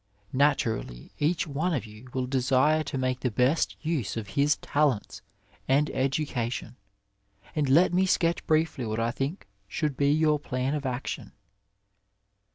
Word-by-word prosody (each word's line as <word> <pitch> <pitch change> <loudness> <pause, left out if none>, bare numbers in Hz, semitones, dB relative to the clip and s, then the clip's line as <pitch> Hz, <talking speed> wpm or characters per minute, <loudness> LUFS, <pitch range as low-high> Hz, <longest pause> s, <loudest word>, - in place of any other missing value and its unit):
Naturally 125 - 0
each 155 +3 +1
one 160 +3 -1
of 125 - -3
you 110 +3 -13
will 130 0 -1
desire 135 +4 +2
to 140 - -3
make 130 -1 0
the 130 - 0
best 125 +8 +1
use«of 115 -9 -2
his 145 +8 +2
talents 145 -7 0 0.5
and 140 +3 +3
education, 130 -4 -2 0.8
and 145 -3 +1
let 170 +7 +5
me 190 +1 +3
sketch 170 -2 +1
briefly 155 -4 +1
what 110 -1 -2
I 115 +1 +1
think 135 - -3 0.2
should 145 +7 -2
be 140 +1 +2
your 155 0 +3
plan 130 -1 -2
of 145 -3 -2
action. 125 0 -4
135 Hz, 145 wpm, -27 LUFS, 125-150 Hz, 0.8 s, let